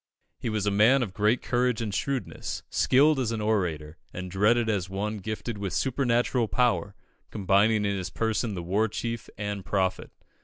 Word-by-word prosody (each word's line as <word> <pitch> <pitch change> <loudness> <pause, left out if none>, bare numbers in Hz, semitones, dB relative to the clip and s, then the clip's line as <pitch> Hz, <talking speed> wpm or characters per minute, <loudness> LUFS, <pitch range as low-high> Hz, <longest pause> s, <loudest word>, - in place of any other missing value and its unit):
He - - -3
was 105 -2 -1
a 105 - +2
man 115 +7 +5
of 100 -6 -6
great 105 +3 +1
courage 125 -1 +1
and 110 -3 -3
shrewdness, 130 +1 -3
skilled 145 +2 +4
as 120 -3 0
an 115 - -2
orator, 90 -8 -1
and 90 0 -6
dreaded 110 +5 +3
as 100 -4 -1
one 105 +3 -3
gifted 110 +2 -5
with 100 -2 -3
supernatural 120 -2 +1
power, 120 -4 +1 0.3
combining 105 +2 +2
in 100 0 0
his 90 -2 -4
person 110 +2 -1
the 90 - -5
war 100 +6 +1
chief 115 +2 -4
and 105 -2 -4
prophet. 95 -1 -1
105 Hz, 175 wpm, -27 LUFS, 100-120 Hz, 0.3 s, man